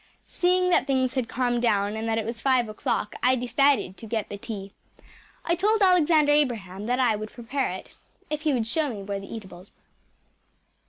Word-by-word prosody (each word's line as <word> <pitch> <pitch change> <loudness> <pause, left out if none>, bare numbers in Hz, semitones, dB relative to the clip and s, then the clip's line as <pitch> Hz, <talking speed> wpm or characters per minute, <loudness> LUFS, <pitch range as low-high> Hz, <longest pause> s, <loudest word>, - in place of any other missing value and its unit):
Seeing 360 0 +1
that - - +3
things 260 -2 +1
had 255 -4 -2
calmed 245 -1 0
down 205 -3 +1
and 220 +1 -3
that 225 - +1
it 225 - -1
was 230 0 -5
five 255 -3 +2
o’clock 215 0 -2
I 255 +1 +4
decided 255 -4 +1
to 225 - -10
get 220 -1 -3
tea. 200 -3 -7 0.7
I 340 - +2
told 420 +4 +2
Alexander 325 -5 +4
Abraham 220 -9 0
that 250 +1 +1
I 245 -4 +3
would 215 +1 -6
prepare 255 +3 -2
it, 190 - -9 0.4
if 300 0 -3
he 310 -1 +1
would 240 -5 0
show 295 +6 0
me 205 -5 -6
where 200 0 -4
the 195 - -11
eatables 190 -4 -9
were. - - -39
245 Hz, 195 wpm, -25 LUFS, 215-290 Hz, 0.7 s, I